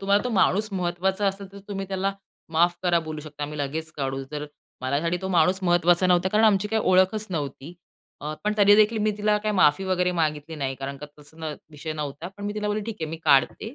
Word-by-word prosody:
तुम्हाला 200 +1 +2
तो - - 0
माणूस 210 +1 +2
महत्त्वाचा 190 +2 -1
असेल 195 0 -2
तर 200 - -10
तुम्ही 195 -1 -4
त्याला 195 0 -1 0.4
माफ 175 +2 +3
करा, 175 -2 +3
बोलू 155 -1 -6
शकता. 150 -1 -6
मी 150 0 -7
लगेच 155 +3 -3
काढू, 135 -1 -2
जर 150 0 -4 0.3
माझ्यासाठी 145 +7 0
तो 190 - -2
माणूस 185 +2 +3
महत्त्वाचा 175 +1 +3
नव्हता 180 +1 +3
कारण 215 +3 +3
आमची 210 -1 +3
काय 220 +1 +1
ओळखच 190 +2 +3
नव्हती. 150 0 -5 0.5
अ, 150 +1 -4
पण 210 - +2
तरी 205 0 +6
देखील 215 +1 +4
मी - - +3
तिला 210 0 +2
काही 210 0 -2
माफी 165 +1 +4
वगैरे 180 -1 +1
मागितली 155 0 -1
नाही 135 -2 -2
कारण 135 +1 -6
का 150 - -8
तसा 150 +2 -14
न 155 -2 -4 0.2
विषय 155 +1 -6
नव्हता. 150 +2 -5
पण 205 - -7
मी 205 +1 -3
तिला 210 -1 -2
बोलली, 210 0 -1
ठीक 225 -2 -5
आहे, 160 -1 -3
मी 165 - -4
काढते. 145 - +2
175 Hz, 225 wpm, -25 LUFS, 150-200 Hz, 0.5 s, तरी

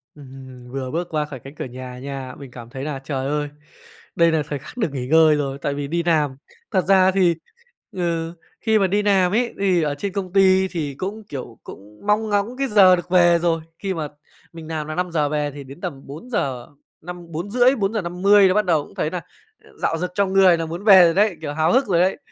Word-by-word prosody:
Ừm. 130 -3 -12
Vừa 130 -1 -4
bước 170 +2 -2
qua 155 -2 -1
khỏi 135 -4 -9
cánh 135 +5 -12
cửa - - -5
nhà 125 0 -9
nha, 135 -1 -7
mình 135 -3 -11
cảm 120 -2 -11
thấy 135 +1 -7
là, 145 -3 -4
trời 135 -1 -4
ơi, 145 0 -2 0.7
đây 170 -1 +4
là 155 -2 +1
thời 145 -2 -3
khắc 155 - -13
được 195 - -1
nghỉ 125 -2 -4
ngơi 160 0 +5
rồi 140 -2 -2
tại 140 - -1
vì 140 0 -4
đi 170 +2 -1
làm. 150 -6 +1 0.3
Thật 190 -3 +2
ra 190 -1 +5
thì, 180 -3 +2 0.6
ừ, 170 -2 -2 0.3
khi 220 -2 +2
mà 195 - +3
đi 205 +3 +1
làm 190 -3 +2
ấy, 240 +2 0
thì 185 -4 +2
ở 145 -1 -1
trên 195 +5 -4
công 190 -2 -4
ty 190 -1 +4
thì 150 -7 -4
cũng, 205 +6 -5
kiểu, 125 -5 -8
cũng 105 +2 -13
mong 215 +1 +2
ngóng 205 +5 -1
cái 275 0 0
giờ 195 -4 +6
được 175 0 -7
về 175 -2 +5
rồi. 165 -2 +1 0.2
Khi 195 -2 -2
mà 155 -3 -3 0.5
mình 160 -1 -10
làm 155 -2 -4
là 155 - -5
5:00 165 -5 0
về 150 -1 -1
thì 140 0 -9
đến 135 +6 -13
tầm 150 -8 -5
bốn 155 - -10
giờ 130 - -2 0.3
năm 175 0 -9
4:30, 240 - +2
4:50 195 -1 +3
là 185 - +2
bắt 210 -1 +2
đầu 160 -5 +2
cũng - - -18
thấy 155 - -1
nà 180 -1 -4 0.6
rạo 165 - 0
rực 180 +2 -3
trong 195 -2 0
người 185 -3 +6
là 165 - -3
muốn 170 +5 -6
về 195 -4 +8
rồi 165 - +3
đấy, 205 -3 +2
kiểu, 145 -2 -4
háo 160 +4 +1
hức 260 -2 +3
rồi 175 -3 +2
đấy. 185 +1 +1
170 Hz, 235 wpm, -21 LUFS, 145-190 Hz, 0.7 s, về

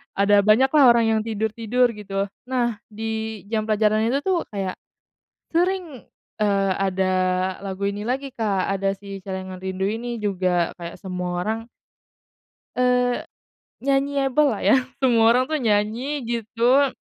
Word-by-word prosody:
ada 200 +1 +4
banyak 215 +6 +4
lah 300 -2 +6
orang 235 -1 +3
yang 220 -1 +2
tidur-tidur, 225 +3 0
gitu. 200 -2 -3 0.2
Nah, 240 -4 -1
di 220 -1 -4
jam 215 -1 -1
pelajaran 215 +1 +2
itu 275 +4 0
tuh 370 -3 0
kayak, 195 -2 -4 0.7
sering, 350 -5 -1 0.4
eee, 195 -2 +2
ada 190 -1 0 0.5
lagu 195 0 -5
ini 205 +1 -4
lagi, 270 +1 -2
Kak, 200 -5 0
ada 195 0 -1
Si 195 -1 -9
Celengan 185 -1 -6
Rindu 190 0 -3
ini 235 +2 -3
juga, 185 -5 0
kayak 170 0 -7
semua 180 -2 -3
orang 220 +1 -1 1.2
Eee, 250 0 +2 0.6
nyanyi-able 275 +1 +2
lah - - -2
ya, - - +6 0.2
semua 235 -4 +4
orang 250 +2 +4
tuh 310 +1 -2
nyanyi 230 +6 0
gitu 235 +4 +2
220 Hz, 140 wpm, -23 LUFS, 195-250 Hz, 1.2 s, lah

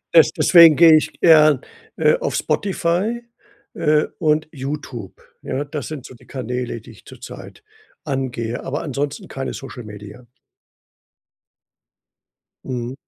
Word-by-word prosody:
des 160 - +7
deswegen 165 -1 +7
gehe 165 0 +7
ich 155 - +1
eher, 155 -4 +6 0.4
äh, - - +4
auf - - -2
Spotify, 195 +4 -1 0.5
äh, 150 -1 +2
und 155 -2 +1
Youtube. 135 - -7 0.2
Ja, 140 +3 -3
das 145 -2 -6
sind 150 -5 -7
so - - -11
die - - -21
Kanäle, 125 -2 -4
die - - -14
ich - - -19
zur - - -13
Zeit 430 - -11 0.4
angehe, 125 -5 -3
aber 145 +3 -3
ansonsten 140 0 -4
keine 135 0 -5
Social 135 -2 -9
Media. 105 +3 -11 2.4
Mhm. 125 -1 -4
145 Hz, 130 wpm, -20 LUFS, 125-155 Hz, 2.4 s, des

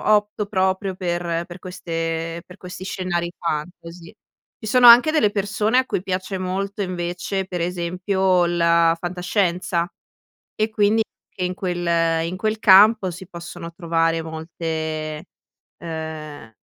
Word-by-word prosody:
opto 210 0 -1
proprio 190 -1 0
per 175 -2 -2
per 175 +1 -11
queste 165 -2 -4
per 180 - -13
questi 180 0 -9
scenari 180 -3 -2
fantasy. 170 +1 -5 0.5
Ci 220 - -6
sono 245 +1 +6
anche 240 +6 +9
delle 255 -10 +3
persone 205 +3 0
a 260 - +4
cui 185 - -2
piace 190 +1 -3
molto, 195 +3 -3
invece, 180 +1 -3
per 180 -2 -4
esempio, 180 +1 +1
la 170 -1 +3
fantascienza. 180 -1 -1 0.7
E, 215 +1 0
quindi, 215 +1 +2 0.3
che 185 - -6
in 180 0 -3
quel 170 -3 0
in 180 +2 -5
quel 215 +2 -1
campo 205 0 +6
si 180 +1 -10
possono 170 -1 -9
trovare 165 -1 0
molte, 160 -1 -4 0.5
uhm, 155 -7 -7
180 Hz, 130 wpm, -22 LUFS, 170-195 Hz, 0.7 s, anche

